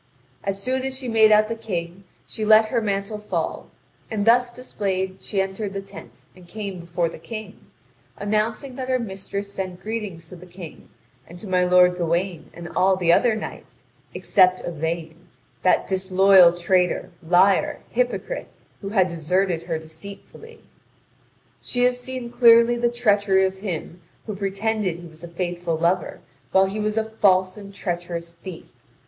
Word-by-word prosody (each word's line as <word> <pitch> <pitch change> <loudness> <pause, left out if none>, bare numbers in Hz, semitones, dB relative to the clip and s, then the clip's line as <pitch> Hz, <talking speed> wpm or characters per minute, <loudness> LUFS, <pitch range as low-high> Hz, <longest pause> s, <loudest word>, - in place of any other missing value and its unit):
As 195 0 -2
soon 260 +5 -1
as 265 0 -3
she 260 -1 -5
made 220 -2 +5
out 215 0 +5
the 230 - -2
King, 185 -4 -5 0.2
she 220 - -6
let 215 0 +6
her 235 -1 +1
mantle 200 0 -2
fall, 210 - -3 0.4
and 205 -2 -2
thus 240 +1 +4
displayed 190 -6 -3
she 200 - -3
entered 195 +1 -2
the 195 - -3
tent 195 0 -13
and 180 -1 -16
came 200 -2 -6
before 170 0 -1
the 165 - -9
King, 215 +3 -9 0.5
announcing 215 +6 -1
that 260 -1 -4
her 255 - +3
mistress 200 -2 -6
sent 185 -2 -5
greetings 205 -7 -5
to - - -10
the 180 +1 -13
King, 175 -2 -11 0.4
and 175 - -11
to 205 - -9
my 180 -1 +2
lord 180 0 +5
Gawain 170 +1 -1
and 170 0 -9
all 190 +1 +3
the 175 -2 +3
other 235 +3 +3
knights, 215 - -8 0.3
except 185 -1 +3
Yvain, 165 +1 -4 0.3
that 185 - +3
disloyal 190 -2 +5
traitor, 180 0 +1
liar, 180 +4 +3
hypocrite, - - -2 0.3
who 195 - -5
had 190 -3 +3
deserted 175 +1 0
her 170 -1 -3
deceitfully. 200 - -12 1.0
"She 245 0 -1
has 250 0 +2
seen 250 -1 -6
clearly 235 -1 +6
the 240 0 +1
treachery 205 -5 +2
of 190 0 -3
him 180 -3 -6 0.2
who 215 - -5
pretended 200 -1 -1
he 175 - -11
was 160 0 -16
a - - -6
faithful 175 -1 -3
lover 175 +3 0 0.3
while 190 0 +5
he 195 +3 -4
was 215 +1 -1
a 220 - +2
false 190 -4 +2
and 200 -1 -10
treacherous 175 -3 -4
thief. 170 0 -10
195 Hz, 165 wpm, -23 LUFS, 175-215 Hz, 1.0 s, let